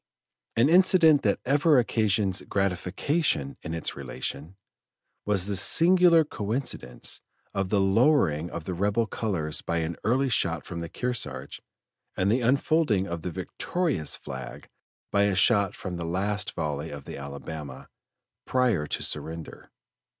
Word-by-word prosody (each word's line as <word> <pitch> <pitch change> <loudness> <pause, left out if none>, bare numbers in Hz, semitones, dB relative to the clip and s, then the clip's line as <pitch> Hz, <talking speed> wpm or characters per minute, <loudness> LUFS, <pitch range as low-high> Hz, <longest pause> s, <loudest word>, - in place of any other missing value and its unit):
An 115 +4 +4
incident 170 -3 +5
that 100 - +1
ever 145 +3 +4
occasions 105 -5 +1
gratification 95 - 0
in 80 - -5
its 80 - -2
relation, 70 +7 -6 0.7
was 100 -3 +2
the 100 0 -1
singular 170 - +6
coincidence 120 0 -3 0.3
of 95 -1 -1
the 105 - +2
lowering 95 - +3
of 85 -1 -6
the 90 - -4
rebel 100 +5 +1
colors 95 -9 -3
by 85 - -2
an 80 0 -2
early 130 +6 +2
shot 85 - 0
from 85 - -6
the 85 -1 -5
Kearsarge, 125 +5 -4 0.6
and 95 +2 +2
the 125 +3 +2
unfolding 130 - +2
of 85 -3 -5
the 90 - -4
victorious 140 - -2
flag - - -8 0.4
by 100 0 +3
a 100 -2 +1
shot 100 +1 +3
from 90 -2 -6
the 85 - -4
last 95 +4 -1
volley 75 0 -3
of 70 -2 -8
the - - -7
Alabama, 70 0 -8 0.6
prior 120 -12 +1
to - - -3
surrender. 80 0 -6
100 Hz, 140 wpm, -26 LUFS, 85-125 Hz, 0.7 s, singular